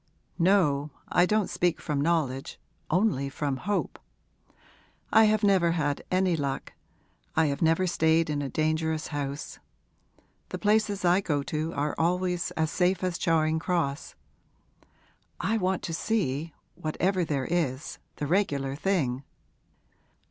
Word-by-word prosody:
'No, 165 Hz, -6 st, +3 dB, 0.2 s
I 175 Hz, +1 st, +4 dB
don't 215 Hz, -1 st, +2 dB
speak 175 Hz, -1 st, 0 dB
from 145 Hz, -2 st, -2 dB
knowledge, 145 Hz, -5 st, -1 dB, 0.3 s
only 175 Hz, -7 st, +1 dB
from 140 Hz, -1 st, -2 dB
hope. 205 Hz, +7 st, -2 dB, 1.1 s
I 220 Hz, 0 st, +7 dB
have 215 Hz, 0 st, +2 dB
never 185 Hz, -4 st, +4 dB
had 145 Hz, -4 st, -1 dB
any 185 Hz, -1 st, +2 dB
luck 140 Hz, -3 st, -3 dB, 0.6 s
I 160 Hz, -, +4 dB
have 140 Hz, +1 st, -1 dB
never 165 Hz, +3 st, +3 dB
stayed 165 Hz, -2 st, +2 dB
in 150 Hz, -1 st, -1 dB
a 140 Hz, -, -3 dB
dangerous 155 Hz, +1 st, -1 dB
house. 140 Hz, -1 st, -4 dB, 0.9 s
The -, -, -4 dB
places 210 Hz, -2 st, +1 dB
I 175 Hz, +3 st, +4 dB
go 145 Hz, -7 st, -1 dB
to 160 Hz, 0 st, -2 dB
are 145 Hz, +1 st, -1 dB
always 180 Hz, +1 st, 0 dB
as 160 Hz, -1 st, +1 dB
safe 185 Hz, +1 st, +1 dB
as 180 Hz, -2 st, -1 dB
Charing 160 Hz, -1 st, +2 dB
Cross. 160 Hz, -4 st, -2 dB, 1.2 s
I 225 Hz, -, 0 dB
want 185 Hz, -1 st, 0 dB
to 165 Hz, -, -4 dB
see 165 Hz, -6 st, -1 dB, 0.2 s
whatever 180 Hz, +4 st, 0 dB
there 140 Hz, -5 st, -1 dB
is, 155 Hz, -5 st, -2 dB, 0.2 s
the 150 Hz, -, -3 dB
regular 145 Hz, -6 st, 0 dB
thing. 140 Hz, -7 st, 0 dB
165 Hz, 135 wpm, -27 LUFS, 145-185 Hz, 1.2 s, I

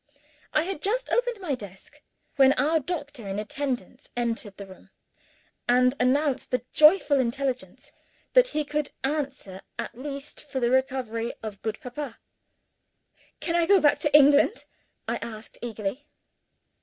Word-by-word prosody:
I 310 Hz, -, +2 dB
had 365 Hz, -3 st, -4 dB
just 485 Hz, +5 st, -1 dB
opened 485 Hz, -2 st, +1 dB
my 350 Hz, -7 st, -2 dB
desk 200 Hz, -6 st, -10 dB, 0.3 s
when 270 Hz, -1 st, +6 dB
our 305 Hz, +5 st, +2 dB
doctor 290 Hz, -, -5 dB
in 195 Hz, +1 st, -3 dB
attendance 250 Hz, +4 st, -4 dB
entered 230 Hz, -4 st, -2 dB
the 200 Hz, -, -7 dB
room, 190 Hz, -1 st, -15 dB, 0.8 s
and 250 Hz, +1 st, +5 dB
announced 275 Hz, +2 st, +1 dB
the 250 Hz, -2 st, -1 dB
joyful 305 Hz, -2 st, +6 dB
intelligence 260 Hz, +1 st, -2 dB, 0.4 s
that -, -, +7 dB
he 305 Hz, -8 st, -2 dB
could 295 Hz, 0 st, -2 dB
answer 270 Hz, -9 st, -3 dB, 0.2 s
at -, -, -4 dB
last 275 Hz, +2 st, -7 dB
for 280 Hz, -3 st, -4 dB
the 240 Hz, -1 st, +1 dB
recovery 255 Hz, -3 st, 0 dB
of 210 Hz, -3 st, -6 dB
good 220 Hz, -1 st, -3 dB
Papa. 250 Hz, -1 st, -6 dB, 1.2 s
"Can 335 Hz, -, -1 dB
I 340 Hz, -1 st, +3 dB
go 400 Hz, -1 st, +6 dB
back 295 Hz, -3 st, +4 dB
to 295 Hz, -1 st, +1 dB
England?" 290 Hz, +8 st, +5 dB, 0.4 s
I -, -, 0 dB
asked 220 Hz, -1 st, -9 dB
eagerly. 230 Hz, +4 st, -4 dB
270 Hz, 145 wpm, -26 LUFS, 235-300 Hz, 1.2 s, that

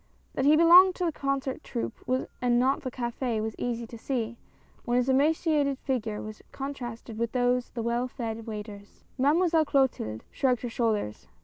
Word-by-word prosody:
That 265 Hz, -, -1 dB
he 295 Hz, +2 st, +7 dB
belonged 355 Hz, +3 st, +8 dB
to 360 Hz, -, -1 dB
the 335 Hz, -, +1 dB
concert 275 Hz, -2 st, -2 dB
troupe 115 Hz, 0 st, -4 dB, 0.4 s
and 245 Hz, -1 st, +3 dB
not 265 Hz, +2 st, +2 dB
to -, -, -19 dB
the -, -, -1 dB
cafe 240 Hz, -1 st, -2 dB
was 220 Hz, 0 st, -3 dB
easy 235 Hz, -1 st, -2 dB
to 230 Hz, 0 st, -11 dB
see, 235 Hz, -2 st, -2 dB, 0.5 s
when 240 Hz, +1 st, 0 dB
his 250 Hz, 0 st, +1 dB
emaci 310 Hz, +5 st, +2 dB
ated 280 Hz, -3 st, +2 dB
figure 230 Hz, -6 st, -2 dB
was 215 Hz, 0 st, -9 dB
contrasted 240 Hz, -5 st, -6 dB
with 235 Hz, 0 st, -1 dB
those 250 Hz, 0 st, +1 dB
of -, -, -32 dB
the 230 Hz, -, -2 dB
well 235 Hz, +2 st, 0 dB
fed 230 Hz, -3 st, -5 dB
waiters. 210 Hz, -2 st, -8 dB, 0.2 s
Mademoiselle 320 Hz, +4 st, +3 dB
Clotilde 265 Hz, -, 0 dB
shrugged 250 Hz, -3 st, +1 dB
her 245 Hz, -, -2 dB
shoulders. 220 Hz, -, -1 dB
245 Hz, 185 wpm, -28 LUFS, 225-275 Hz, 0.5 s, belonged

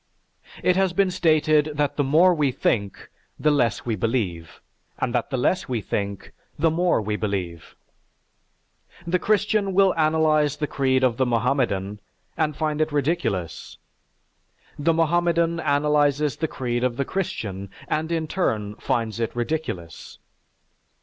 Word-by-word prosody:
It 180 Hz, -, +3 dB
has 190 Hz, -2 st, +2 dB
been 195 Hz, 0 st, +2 dB
stated 155 Hz, -3 st, +2 dB
that 145 Hz, -1 st, 0 dB
the 145 Hz, -, +1 dB
more 165 Hz, +7 st, +5 dB
we 150 Hz, -5 st, +1 dB
think, 100 Hz, -5 st, -2 dB, 0.3 s
the 150 Hz, -, +3 dB
less 120 Hz, -8 st, +1 dB
we 115 Hz, -2 st, -1 dB
believe; 95 Hz, -7 st, -2 dB, 0.4 s
and 120 Hz, -, -2 dB
that 120 Hz, -2 st, -1 dB
the 135 Hz, -, -2 dB
less 130 Hz, +7 st, 0 dB
we 120 Hz, -3 st, 0 dB
think, 100 Hz, -1 st, -4 dB, 0.3 s
the 165 Hz, -1 st, +2 dB
more 175 Hz, -1 st, +2 dB
we 105 Hz, 0 st, -2 dB
believe. 95 Hz, -6 st, -4 dB, 1.3 s
The 180 Hz, +2 st, +1 dB
Christian 205 Hz, -1 st, +1 dB
will 195 Hz, -1 st, +5 dB
analyze 155 Hz, -2 st, +2 dB
the 150 Hz, -, -1 dB
creed 130 Hz, -2 st, +1 dB
of 120 Hz, -3 st, +2 dB
the 130 Hz, -, +2 dB
Mohammedan 115 Hz, -5 st, 0 dB, 0.4 s
and 155 Hz, -3 st, -1 dB
find 155 Hz, -1 st, -1 dB
it 155 Hz, 0 st, 0 dB
ridiculous; 145 Hz, -, -2 dB, 1.0 s
the 160 Hz, +3 st, +2 dB
Mohammedan 170 Hz, +1 st, +1 dB
analyzes 145 Hz, -2 st, +2 dB
the 160 Hz, -, -1 dB
creed 120 Hz, -3 st, -3 dB
of 125 Hz, -2 st, 0 dB
the 140 Hz, -, 0 dB
Christian 100 Hz, -, -4 dB, 0.2 s
and 160 Hz, +2 st, -2 dB
in 165 Hz, -1 st, -1 dB
turn 105 Hz, -, -1 dB
finds 115 Hz, -3 st, -2 dB
it 115 Hz, 0 st, -2 dB
ridiculous. 120 Hz, -, -4 dB
145 Hz, 145 wpm, -23 LUFS, 115-160 Hz, 1.3 s, more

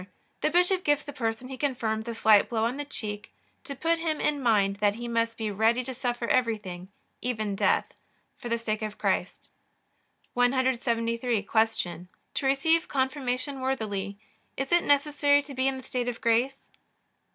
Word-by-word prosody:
The -, -, +2 dB
bishop 360 Hz, +3 st, +3 dB
gives 290 Hz, 0 st, +2 dB
the 290 Hz, -, -8 dB
person 230 Hz, -1 st, -2 dB
he 265 Hz, 0 st, -7 dB
confirms 230 Hz, -5 st, -1 dB
a 230 Hz, -, -3 dB
slight 215 Hz, -2 st, +5 dB
blow 225 Hz, -1 st, +1 dB
on 245 Hz, +4 st, -1 dB
the 290 Hz, -, -4 dB
cheek, 210 Hz, -5 st, -5 dB, 0.3 s
to 280 Hz, -, -6 dB
put 330 Hz, +5 st, +1 dB
him 320 Hz, -2 st, -1 dB
in 290 Hz, -2 st, 0 dB
mind 205 Hz, -5 st, +3 dB
that 205 Hz, 0 st, +2 dB
he 240 Hz, +1 st, -6 dB
must 230 Hz, -1 st, 0 dB
be 220 Hz, -2 st, -2 dB
ready 225 Hz, +5 st, +2 dB
to 260 Hz, +1 st, -5 dB
suffer 245 Hz, -1 st, -2 dB
everything, 210 Hz, -7 st, 0 dB, 0.3 s
even 215 Hz, -5 st, -2 dB
death, -, -, +2 dB, 0.5 s
for 240 Hz, -, -7 dB
the 235 Hz, -, +1 dB
sake 220 Hz, -1 st, -3 dB
of 215 Hz, -1 st, -4 dB
Christ. -, -, -2 dB, 0.8 s
173. 245 Hz, -3 st, +1 dB
Q. 200 Hz, -5 st, 0 dB, 0.3 s
To -, -, -2 dB
receive 320 Hz, +5 st, +2 dB
Confirmation 265 Hz, 0 st, -1 dB
worthily 205 Hz, -7 st, -2 dB, 0.4 s
is 270 Hz, 0 st, -3 dB
it 345 Hz, 0 st, +4 dB
necessary 285 Hz, 0 st, +3 dB
to 280 Hz, -1 st, -8 dB
be 260 Hz, 0 st, +1 dB
in 270 Hz, 0 st, 0 dB
the 260 Hz, -, -9 dB
state 250 Hz, -1 st, -3 dB
of 235 Hz, -, -5 dB
grace? 240 Hz, +4 st, +2 dB
245 Hz, 170 wpm, -27 LUFS, 220-275 Hz, 0.8 s, slight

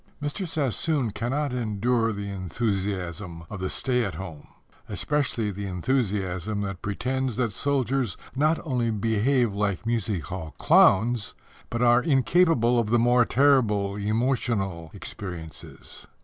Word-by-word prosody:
Mr. 150 Hz, +6 st, -3 dB
Sassoon 140 Hz, -, 0 dB
cannot 135 Hz, +6 st, -2 dB
endure 115 Hz, 0 st, 0 dB
the 100 Hz, -1 st, -5 dB
enthusiasm 95 Hz, -3 st, -3 dB
of 100 Hz, -, -5 dB
the 95 Hz, 0 st, -2 dB
stay 125 Hz, -2 st, +1 dB
at 100 Hz, -7 st, -3 dB
home 85 Hz, -4 st, -8 dB, 0.4 s
especially 130 Hz, -7 st, -1 dB
the 100 Hz, +1 st, -5 dB
enthusiasm 100 Hz, -1 st, -1 dB
that 95 Hz, -2 st, -4 dB
pretends 125 Hz, +4 st, -2 dB
that 115 Hz, -3 st, -1 dB
soldiers 135 Hz, -2 st, 0 dB, 0.2 s
not 155 Hz, +4 st, +2 dB
only 125 Hz, -5 st, 0 dB
behave 115 Hz, +2 st, +1 dB
like 100 Hz, 0 st, -1 dB
music 110 Hz, -7 st, -1 dB
hall 85 Hz, -4 st, -6 dB
clowns, 110 Hz, +2 st, +4 dB, 0.3 s
but 115 Hz, +1 st, -1 dB
are 120 Hz, 0 st, +5 dB
incapable 135 Hz, -3 st, +3 dB
of 110 Hz, -3 st, -1 dB
the 120 Hz, -, +4 dB
more 120 Hz, +1 st, +4 dB
terrible 115 Hz, -9 st, +3 dB
emotional 105 Hz, -5 st, -1 dB
experiences. 85 Hz, -6 st, -8 dB
115 Hz, 125 wpm, -26 LUFS, 100-125 Hz, 0.4 s, are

